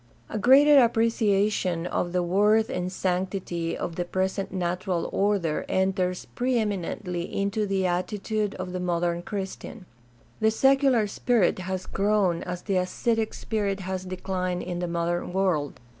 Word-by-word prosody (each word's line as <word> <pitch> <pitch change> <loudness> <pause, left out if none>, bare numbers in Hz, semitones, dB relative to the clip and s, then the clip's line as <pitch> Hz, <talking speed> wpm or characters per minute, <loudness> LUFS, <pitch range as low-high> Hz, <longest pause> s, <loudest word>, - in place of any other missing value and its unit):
— 115 - -32
A - - 0
greater 275 +4 +7
appreciation 210 -6 +1
of 175 0 -1
the 180 0 +1
worth 210 +6 +3
and 180 -3 -2
sanctity 180 -2 -2
of 165 - -5
the 175 - 0
present 190 +2 -2
natural 180 -1 -2
order 195 -6 +1
enters 185 -1 0
pre 250 0 0
eminently 185 -4 -3
into 200 +2 -1
the 195 -1 0
attitude 205 +3 -1
of 185 -1 -5
the 185 - -2
modern 175 -1 0
Christian. 195 +2 -6 0.5
The 220 - +4
secular 270 0 +3
spirit 205 -2 +1
has 185 0 -4
grown 200 -4 +1
as 180 -1 -5
the 195 -3 0
ascetic 220 +5 0
spirit 200 -3 -2
has 185 0 -4
declined 185 -1 -3
in 175 -1 -4
the 175 - -2
modern 170 +1 -2
world. 180 -7 0
190 Hz, 145 wpm, -26 LUFS, 180-210 Hz, 0.5 s, greater